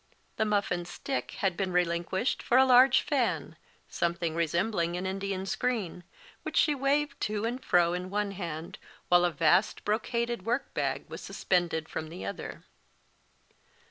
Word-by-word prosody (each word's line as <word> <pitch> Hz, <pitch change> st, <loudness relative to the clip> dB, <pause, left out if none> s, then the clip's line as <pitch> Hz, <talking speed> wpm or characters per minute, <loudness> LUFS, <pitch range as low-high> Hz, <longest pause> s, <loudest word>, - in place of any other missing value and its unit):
The 220 Hz, -, +2 dB
muff 205 Hz, -1 st, +1 dB
and 175 Hz, -1 st, -2 dB
stick 265 Hz, +9 st, -4 dB
had 195 Hz, -3 st, +1 dB
been 190 Hz, 0 st, -2 dB
relinquished 175 Hz, +5 st, 0 dB
for 245 Hz, -, +2 dB
a 265 Hz, -, +7 dB
large 255 Hz, 0 st, +6 dB
fan, 180 Hz, -, -1 dB, 0.3 s
something 170 Hz, -1 st, -1 dB
resembling 170 Hz, +2 st, 0 dB
an 180 Hz, -, -4 dB
Indian 190 Hz, 0 st, -3 dB
screen, 200 Hz, -5 st, -2 dB, 0.4 s
which -, -, -4 dB
she 300 Hz, -, +4 dB
waved 280 Hz, +1 st, 0 dB
to 210 Hz, 0 st, -1 dB
and 245 Hz, +3 st, -3 dB
fro 175 Hz, -1 st, +3 dB
in 180 Hz, +1 st, -4 dB
one 205 Hz, 0 st, -1 dB
hand, 170 Hz, -4 st, -6 dB, 0.3 s
while 175 Hz, 0 st, +6 dB
a 175 Hz, -, +1 dB
vast 165 Hz, +7 st, +2 dB
brocaded 235 Hz, +1 st, -1 dB
workbag 240 Hz, +5 st, -2 dB
was -, -, -8 dB
suspended 170 Hz, -4 st, 0 dB
from 155 Hz, -, -5 dB
the 95 Hz, -, -7 dB
other. 100 Hz, -, -6 dB
190 Hz, 150 wpm, -29 LUFS, 170-235 Hz, 0.4 s, a